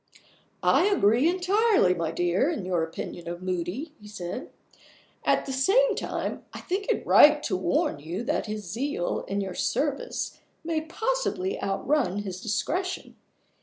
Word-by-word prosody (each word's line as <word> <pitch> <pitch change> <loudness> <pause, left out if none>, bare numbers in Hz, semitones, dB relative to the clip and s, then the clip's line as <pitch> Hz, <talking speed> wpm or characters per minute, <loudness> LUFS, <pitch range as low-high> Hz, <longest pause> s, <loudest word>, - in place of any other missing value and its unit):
"I - - +4
agree 255 - +4
entirely, 375 - +3
my 165 -3 -2
dear, 175 - +1
in 305 - -3
your 180 -2 0
opinion 165 +1 -5
of 175 +1 -5
Moody," 185 - -3
he 210 - -12
said. 205 +2 -6 0.7
"At - - +2
the 270 - -4
same 415 - +4
time, - - -3
I - - -6
think 390 +3 -3
it - - 0
right 295 0 +7
to 190 - 0
warn 180 -5 0
you 170 +9 -5
that 290 -1 -1
his 215 0 -4
zeal 230 -2 -2
in 200 +1 -1
your 190 -2 -4
service 280 +8 -2 0.2
may 320 -1 -1
possibly 390 +2 -2
outrun 205 0 0
his 185 -2 -6
discretion. 355 - -2
235 Hz, 150 wpm, -27 LUFS, -, 0.7 s, right